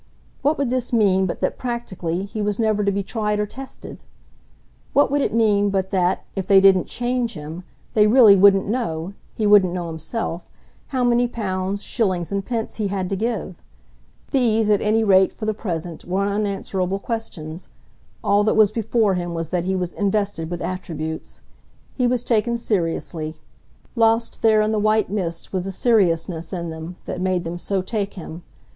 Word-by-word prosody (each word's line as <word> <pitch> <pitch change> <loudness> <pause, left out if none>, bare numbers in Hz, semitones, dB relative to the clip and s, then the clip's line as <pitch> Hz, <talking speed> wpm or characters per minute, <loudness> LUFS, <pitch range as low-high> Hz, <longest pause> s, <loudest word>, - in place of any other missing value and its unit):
What 295 +3 +2
would 275 -4 -1
this 255 -1 -1
mean 195 -5 +3
but - - -5
that, - - -1
practically, 195 -8 -3
he 215 +2 -5
was 205 -1 -1
never 215 -2 +1
to 200 - +2
be 200 0 -1
tried 210 0 -1
or 210 - +1
tested? 265 +6 -10 0.9
What 285 -1 +4
would 285 0 +2
it - - 0
mean 210 -3 +3
but 190 -1 -1
that, 185 -1 +1
if 195 -2 -3
they 195 -1 +7
didn't 190 -1 +5
"change" 245 -1 -1
him, 155 +4 -7 0.3
they 210 -1 +5
really 220 -3 +7
wouldn't 195 0 +5
know 195 -6 -2 0.2
he 215 - -1
wouldn't 200 -4 +5
know 180 -1 -3
himself 165 +2 -4 0.4
how 260 -2 -1
many 245 0 +3
pounds, 200 -3 -3
shillings 185 -7 -1
and 200 0 -1
pence 230 0 -3
he 215 -2 -1
had 190 -1 -3
to - - +1
give? 215 -3 -3 0.7
These 225 -5 +2
at 205 - +3
any 220 +1 +2
rate, 190 -2 +5
for 215 - -7
the 215 - 0
present, 170 -5 -5
were 190 +3 -1
unanswerable 200 -2 -1
questions; 185 -7 -6 0.5
all 205 +1 +3
that 220 - +2
was 215 -2 +5
before 220 -2 +1
him 175 -1 -3
was 165 -1 -3
that 175 -1 -1
he 190 +1 0
was 180 -2 -2
invested 200 -5 -1
with 175 0 -4
attributes. 160 -4 -5 0.5
He 250 -2 +1
was 245 -1 0
taken 235 0 +1
seriously. 165 -6 -2 0.6
Lost 225 0 +2
there 220 -1 +5
in 215 0 +1
the 215 - +1
white 215 -1 +2
mist 180 -5 -4
was 185 -1 -1
the 195 - -3
seriousness 175 -6 +1
in 170 -3 -4
them 160 +2 -7
that 180 - -4
made 185 -1 0
them 170 +1 -5
so 190 0 -1
take 200 0 -3
him. 170 -2 -8
200 Hz, 180 wpm, -22 LUFS, 180-225 Hz, 0.9 s, they